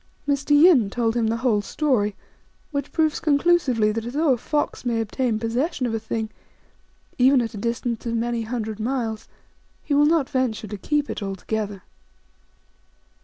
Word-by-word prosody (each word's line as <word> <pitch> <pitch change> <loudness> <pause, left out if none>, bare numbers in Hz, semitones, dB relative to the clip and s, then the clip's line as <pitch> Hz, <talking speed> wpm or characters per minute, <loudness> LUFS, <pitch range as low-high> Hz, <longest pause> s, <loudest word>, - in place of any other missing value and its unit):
Mr. 280 0 -1
Yin 295 - +6
told 230 +1 0
him 230 -2 +1
the 225 +1 0
whole 215 -5 +3
story, 210 -4 0 0.6
which 285 -1 -3
proves 315 -2 +1
conclusively 285 -8 +2
that 225 +1 -3
although 280 +5 +1
a - - -1
fox 295 +4 -2
may 235 -2 0
obtain 225 +1 -1
pos 225 +1 -3
session 265 +1 0
of 235 - -2
a 225 - -1
thing, 220 0 -4 0.9
even 260 +2 +6
at 230 -2 -2
a - - -7
distance 235 +2 -3
of 230 - -1
many 235 0 -1
hundred 220 -2 -4
miles, 225 -2 -2 0.6
he 290 - -2
will 290 +1 +5
not 315 -4 +2
venture 255 -6 -1
to 210 - -6
keep 295 +8 -1
it - - -5
altogether. 200 0 -4
235 Hz, 170 wpm, -23 LUFS, 220-280 Hz, 0.9 s, Yin